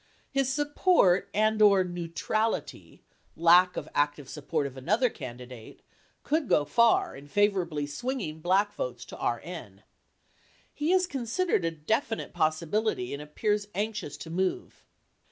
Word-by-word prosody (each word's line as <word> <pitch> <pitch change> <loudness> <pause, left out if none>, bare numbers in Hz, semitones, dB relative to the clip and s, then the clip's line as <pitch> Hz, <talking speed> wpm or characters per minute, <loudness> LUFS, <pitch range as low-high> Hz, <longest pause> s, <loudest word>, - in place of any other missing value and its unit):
His 270 -1 +1
support 290 - +3
and/or 210 -2 +4
"neutrality" 175 +5 -3 0.3
(lack 175 +2 +5
of - - -4
active 145 -1 0
support 150 0 -2
of 135 -1 -6
another 215 - +1
candidate) 125 -4 -10 0.4
could 310 -1 0
go 145 - +3
far 235 +7 +3
in 140 +1 -12
favorably 180 -5 +1
swinging 160 - -4
black 190 +5 +2
votes - - -5
to - - -10
RN. - - -5 0.9
He 300 +3 -1
is 370 0 +4
considered 270 - -1
a 165 - +1
definite 220 - -2
possibility 155 - 0
and 140 - -5
appears 205 +7 -1
anxious 210 -7 -3
to 160 - -9
move. 185 +2 -2
190 Hz, 125 wpm, -28 LUFS, 155-225 Hz, 0.9 s, lack